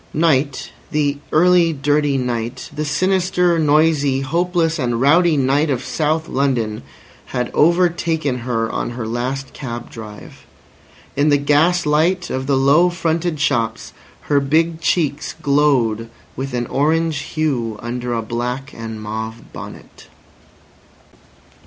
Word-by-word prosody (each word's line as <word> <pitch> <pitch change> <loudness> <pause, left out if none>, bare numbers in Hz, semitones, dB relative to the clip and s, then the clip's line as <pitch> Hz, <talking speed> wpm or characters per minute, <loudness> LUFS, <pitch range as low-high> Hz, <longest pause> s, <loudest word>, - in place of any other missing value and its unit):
Night, 145 -3 +1 0.2
the 145 -2 0
early 175 0 +4
dirty 145 0 +1
night, 120 0 -3
the 155 - -2
sinister, 180 +1 +1
noisy, 150 -3 +3
hopeless 165 +3 0
and 120 -3 -1
rowdy 160 +4 +4
night 140 +3 +2
of 130 -2 -1
South 160 +1 -1
London, 125 -6 -1 0.5
had 125 -1 -3
overtaken 165 -4 +2
her 115 -2 -1
on - - -2
her 110 -3 -4
last 130 +4 -3
cab 120 -4 -7
drive. 110 -2 -11 0.7
In 145 +2 +2
the 145 - +5
gas 150 +5 +2
light 170 +5 +1
of 130 0 -3
the 140 -2 +2
low 145 +7 +4
fronted 170 -2 -1
shops 120 -6 -1 0.3
her 145 -1 +2
big 160 +4 +1
cheeks 150 -3 0
glowed 135 -7 +1 0.3
with 135 0 -4
an 120 0 -1
orange 155 +3 0 0.2
hue 120 -8 -1
under 120 +1 -4
a 115 - -2
black 125 +5 -4
and 110 -1 -6
mauve 110 +1 -6
bonnet. - - -11
145 Hz, 125 wpm, -19 LUFS, 125-160 Hz, 0.7 s, the